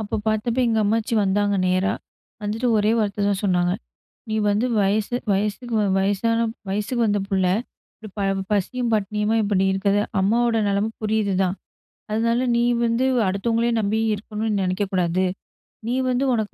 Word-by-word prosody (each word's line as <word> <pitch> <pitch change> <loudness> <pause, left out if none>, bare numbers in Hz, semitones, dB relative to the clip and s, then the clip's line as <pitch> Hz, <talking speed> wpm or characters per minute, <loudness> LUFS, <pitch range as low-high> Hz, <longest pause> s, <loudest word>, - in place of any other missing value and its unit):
அப்ப 210 0 -3
பார்த்தப்ப 220 +3 0
எங்க 225 -1 +1
அம்மாச்சி 225 +3 0
வந்தாங்க 205 +1 +1
நேரா. 185 +2 +1 0.5
வந்துட்டு 220 +4 -1
ஒரே 210 +1 +2
வார்த்த 205 -1 0
தான் 195 -1 0
சொன்னாங்க. 180 -2 +2 0.6
"நீ - - -1 0.2
வந்து 210 +5 +1
வயசு 210 +4 +1 0.2
வயசுக்கு 210 +4 -2 0.2
வயசான 205 +4 +1
ப் 225 - -11 0.2
வயசுக்கு 210 +5 -1
வந்த 205 -1 +1
புள்ள. 190 -2 +1 0.5
இப்டி 215 - -11
ப - - 0 0.3
பசியும் 235 +4 0
பட்டினியுமா 210 +2 0
இப்டி 195 -2 +1
இருக்குது, 200 +1 +1 0.2
அம்மாவோட 230 +4 +2
நெலம 200 +3 0
புரியுது 215 -2 0
தான். 185 +1 0 0.5
அதனால 230 +2 +1 0.2
நீ 235 - +2 0.2
வந்து 230 +2 +1 0.2
அடுத்தவங்களையும் 230 +4 0
நம்பி 215 +2 0
இருக்கணும்னு 210 0 -3
நெனைக்கக்கூடாது. 185 -1 0 0.6
நீ 245 - 0
வந்து 250 +2 +1
உனக்கு 220 -3 -2
210 Hz, 145 wpm, -22 LUFS, 200-230 Hz, 0.6 s, ஒரே